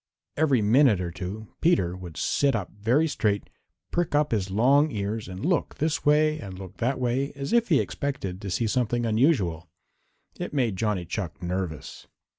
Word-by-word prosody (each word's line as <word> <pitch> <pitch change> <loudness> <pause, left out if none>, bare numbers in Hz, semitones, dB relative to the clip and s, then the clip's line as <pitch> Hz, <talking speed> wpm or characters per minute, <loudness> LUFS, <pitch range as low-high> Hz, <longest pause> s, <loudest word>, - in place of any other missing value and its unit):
Every 140 -7 +2
minute 115 -1 +5
or 90 -2 -3
two 95 +5 -6
Peter 95 - +2
would 90 -3 -9
sit 140 -3 +1
up 100 -5 -3
very 120 +10 +1
straight, 105 -9 -1 0.4
prick 175 -3 0
up 150 0 +2
his 100 -4 0
long 135 +9 +4
ears 105 -2 -3
and 95 +7 -6
look 175 0 0
this 155 +1 -1
way 155 +1 +3
and 95 -2 -8
look 95 0 -10
that 130 +3 0
way 130 +3 0
as 140 +8 -4
if 235 -2 +3
he 150 -5 +5
expected 105 -10 -3
to 100 - -5
see 115 +6 0
something 120 +1 0
unusual. 110 - +1 0.7
It - - -4
made 120 -7 +1
Johnny 100 -3 -1
Chuck 85 -4 -5
nervous. 90 -3 -4
110 Hz, 175 wpm, -26 LUFS, 95-140 Hz, 0.7 s, minute